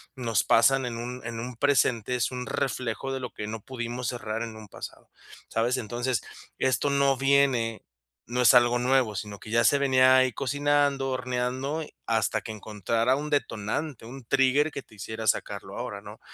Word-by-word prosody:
nos 115 Hz, -6 st, 0 dB
pasan 130 Hz, +3 st, +4 dB
en 120 Hz, -1 st, -4 dB
un 125 Hz, +2 st, -5 dB
en 115 Hz, -1 st, -5 dB
un 125 Hz, +1 st, -6 dB
presente, 125 Hz, -4 st, +2 dB
es 125 Hz, 0 st, 0 dB
un 125 Hz, -1 st, -4 dB
reflejo 130 Hz, 0 st, -2 dB
de 135 Hz, -, -3 dB
lo 125 Hz, -, -5 dB
que 105 Hz, -, -6 dB
no 110 Hz, +1 st, -5 dB
pudimos 120 Hz, 0 st, -4 dB
cerrar 110 Hz, -2 st, -4 dB
en 115 Hz, -1 st, -7 dB
un 110 Hz, -1 st, -11 dB
pasado, -, -, -10 dB, 0.4 s
¿sabes? 120 Hz, +3 st, +1 dB
Entonces, 120 Hz, +1 st, -1 dB, 0.4 s
esto 130 Hz, +2 st, +1 dB
no 140 Hz, -1 st, +3 dB
viene 135 Hz, -4 st, +2 dB, 0.5 s
no 125 Hz, +1 st, +1 dB
es 125 Hz, -, +7 dB
algo 120 Hz, 0 st, +5 dB
nuevo, 125 Hz, -3 st, +2 dB
sino 100 Hz, 0 st, -6 dB
que -, -, -11 dB
ya 115 Hz, +1 st, +3 dB
se 140 Hz, -, +4 dB
venía 130 Hz, -2 st, +5 dB
ahí 130 Hz, -1 st, +4 dB
cocinando, 145 Hz, +1 st, +1 dB
horneando, 130 Hz, +4 st, -2 dB, 0.2 s
hasta 110 Hz, -2 st, +1 dB
que 110 Hz, -, -7 dB
encontrara 110 Hz, +3 st, 0 dB
un 150 Hz, +2 st, -4 dB
detonante, 135 Hz, 0 st, -2 dB
un 130 Hz, +3 st, -9 dB
trigger 135 Hz, +5 st, +3 dB
que 140 Hz, -, -6 dB
te -, -, -22 dB
hiciera 110 Hz, +2 st, -6 dB
sacarlo -, -, -1 dB
ahora, -, -, -5 dB
¿no? -, -, -11 dB
125 Hz, 180 wpm, -27 LUFS, 115-135 Hz, 0.5 s, es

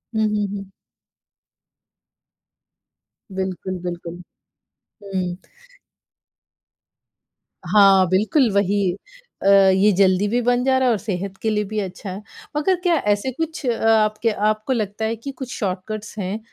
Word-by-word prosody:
हुँ, 220 Hz, -, +2 dB
हुँ, 210 Hz, -1 st, -1 dB
हुँ। 195 Hz, -1 st, -7 dB, 2.7 s
बिल्कुल, 185 Hz, 0 st, -3 dB
बिल्कुल, 175 Hz, 0 st, -6 dB, 0.8 s
हुँ। 185 Hz, -3 st, -3 dB, 2.3 s
हाँ, 195 Hz, -3 st, +6 dB
बिल्कुल, 215 Hz, +7 st, +2 dB
वही। 200 Hz, -1 st, +1 dB, 0.5 s
अ, -, -, +1 dB
ये 195 Hz, +1 st, +5 dB
जल्दी 190 Hz, +1 st, +3 dB
भी 240 Hz, +3 st, 0 dB
बन 245 Hz, +1 st, +1 dB
जा 260 Hz, 0 st, +3 dB
रहा 260 Hz, -1 st, +2 dB
है -, -, +4 dB
और 220 Hz, -, +1 dB
सेहत 195 Hz, -1 st, -4 dB
के 220 Hz, -, 0 dB
लिए 210 Hz, -1 st, 0 dB
भी 215 Hz, +1 st, -3 dB
अच्छा, 190 Hz, 0 st, -5 dB, 0.4 s
मगर 370 Hz, +5 st, +2 dB
क्या 345 Hz, -2 st, +3 dB, 0.2 s
ऐसे 230 Hz, +6 st, -3 dB
कुछ 320 Hz, +1 st, -4 dB
अ, 235 Hz, -2 st, -1 dB
आपके 215 Hz, +1 st, +2 dB, 0.2 s
आपको 215 Hz, +5 st, -1 dB
लगता 215 Hz, -1 st, -2 dB
है 225 Hz, +1 st, -1 dB
कि 250 Hz, +5 st, -7 dB
कुछ 265 Hz, -2 st, -7 dB
शॉर्टकट्स 205 Hz, +3 st, -4 dB
हैं, 195 Hz, +3 st, -3 dB
205 Hz, 130 wpm, -21 LUFS, 190-230 Hz, 2.7 s, हाँ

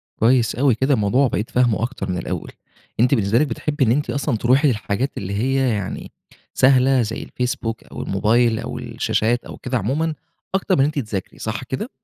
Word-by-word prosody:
كويس 120 Hz, 0 st, +3 dB
أوي، 130 Hz, 0 st, +3 dB
كده 130 Hz, +5 st, +2 dB
الموضوع 125 Hz, +4 st, +3 dB
بقيت 105 Hz, 0 st, -2 dB
فاهمُه 120 Hz, -3 st, +2 dB
أكتر 115 Hz, -5 st, -4 dB
من 90 Hz, -, -1 dB
الأول، 85 Hz, -, -4 dB, 0.5 s
أنتِ 125 Hz, +4 st, +4 dB
بالنسبة 110 Hz, 0 st, +2 dB
لِك 155 Hz, -, +2 dB
بتحبي 145 Hz, +4 st, -1 dB
إن 110 Hz, -, +3 dB
أنتِ 145 Hz, +1 st, 0 dB
أصلًا 135 Hz, -1 st, -1 dB
تروحي 130 Hz, +7 st, +3 dB
للحاجات 120 Hz, +1 st, -1 dB
اللي 100 Hz, 0 st, -4 dB
هي 130 Hz, +5 st, +1 dB
يعني 105 Hz, -5 st, -4 dB, 0.4 s
سهلة، 130 Hz, 0 st, +4 dB
زي 115 Hz, 0 st, -3 dB
الفيسبوك 120 Hz, -2 st, -3 dB
أو -, -, -8 dB
الموبايل 110 Hz, +3 st, +2 dB
أو -, -, -5 dB
الشاشات 120 Hz, +3 st, -1 dB
أو -, -, -9 dB
كده 130 Hz, 0 st, -2 dB
عمومًا، 145 Hz, +10 st, -1 dB, 0.4 s
أكتر 190 Hz, 0 st, +1 dB
من -, -, 0 dB
إن -, -, +5 dB
أنتِ -, -, +1 dB
تذاكري 95 Hz, -4 st, -5 dB
صح 110 Hz, +4 st, -4 dB
كده؟ 130 Hz, -, -4 dB
120 Hz, 190 wpm, -21 LUFS, 110-135 Hz, 0.5 s, إن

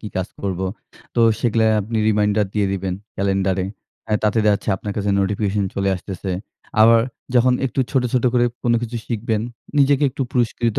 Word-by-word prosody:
কি 105 Hz, -, -6 dB
কাজ 95 Hz, -1 st, -1 dB
করবো? 95 Hz, -1 st, -2 dB, 0.5 s
তো 120 Hz, -, +2 dB, 0.2 s
সেগুলা 115 Hz, -1 st, +2 dB, 0.2 s
আপনি 110 Hz, +2 st, -3 dB
রিমাইন্ডার 105 Hz, -1 st, +2 dB
দিয়ে 105 Hz, -2 st, +2 dB
দিবেন 95 Hz, -1 st, -2 dB, 0.2 s
ক্যালেন্ডারে 95 Hz, -1 st, 0 dB, 0.5 s
আ -, -, +1 dB
তাতে 105 Hz, +2 st, +2 dB
দেখাচ্ছে 105 Hz, 0 st, +2 dB
আপনার 100 Hz, +2 st, -5 dB
কাছে 100 Hz, -1 st, 0 dB
নোটিফিকেশন 100 Hz, 0 st, 0 dB
চলে 100 Hz, 0 st, 0 dB
আসতেছে। 95 Hz, +1 st, -6 dB, 0.5 s
আবার 115 Hz, +1 st, +7 dB, 0.3 s
যখন 125 Hz, +1 st, +5 dB
একটু 135 Hz, -, -2 dB
ছোট, 135 Hz, -3 st, +2 dB
ছোট 125 Hz, -1 st, +1 dB
করে 120 Hz, 0 st, +4 dB, 0.2 s
কোনো 120 Hz, -1 st, +3 dB
কিছু 120 Hz, 0 st, -4 dB
শিখবেন, 110 Hz, -2 st, -1 dB, 0.4 s
নিজেকে 140 Hz, 0 st, +4 dB
একটু 135 Hz, +1 st, -3 dB
পুরস্কৃত 120 Hz, -2 st, 0 dB
105 Hz, 165 wpm, -21 LUFS, 100-120 Hz, 0.5 s, আবার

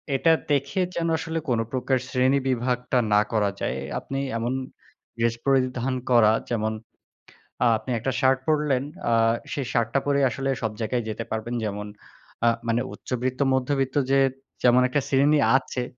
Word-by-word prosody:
এটা 165 Hz, +5 st, +3 dB, 0.2 s
দেখে 145 Hz, +7 st, +1 dB
যেন 170 Hz, -1 st, -1 dB
আসলে 165 Hz, 0 st, -3 dB
কোনো 115 Hz, -2 st, +1 dB
প্রকার 130 Hz, 0 st, 0 dB
শ্রেণী 130 Hz, +2 st, +2 dB
বিভাগটা 125 Hz, 0 st, 0 dB, 0.2 s
না 105 Hz, -, +6 dB
করা 105 Hz, -3 st, +2 dB
যায়। -, -, -1 dB
এ -, -, -5 dB, 0.2 s
আপনি 135 Hz, -, -5 dB, 0.2 s
এমন 120 Hz, +2 st, -1 dB, 0.6 s
ড্রেস 115 Hz, 0 st, +1 dB
পরিধান 130 Hz, -1 st, +1 dB, 0.2 s
করা, 115 Hz, -3 st, +6 dB, 0.2 s
যেমন 110 Hz, -2 st, 0 dB, 0.9 s
আ -, -, +4 dB
আপনি 130 Hz, -, -7 dB
একটা 135 Hz, -, -1 dB
শার্ট 130 Hz, -1 st, +3 dB
পরলেন, 150 Hz, -4 st, +1 dB, 0.3 s
আ -, -, +4 dB, 0.4 s
সেই 140 Hz, -, -2 dB
শার্টটা 120 Hz, +3 st, +1 dB
পরেই 140 Hz, -1 st, +2 dB
আসলে 135 Hz, +3 st, -3 dB
সব 110 Hz, -2 st, -1 dB
জায়গায় 120 Hz, +2 st, -1 dB
যেতে 110 Hz, +1 st, -4 dB
পারবেন। 110 Hz, +2 st, -3 dB
যেমন 105 Hz, -1 st, -4 dB, 0.6 s
আ -, -, +5 dB, 0.2 s
মানে 115 Hz, +1 st, +1 dB
উচ্চবিত্ত, 125 Hz, +3 st, -3 dB
মধ্যবিত্ত 130 Hz, 0 st, 0 dB, 0.2 s
যে 135 Hz, -, +5 dB, 0.4 s
যেমন 125 Hz, +1 st, +5 dB
একটা 140 Hz, +3 st, 0 dB
শ্রেণী 145 Hz, +2 st, +4 dB, 0.2 s
আছে, 130 Hz, -1 st, -4 dB
130 Hz, 160 wpm, -25 LUFS, 115-135 Hz, 0.9 s, না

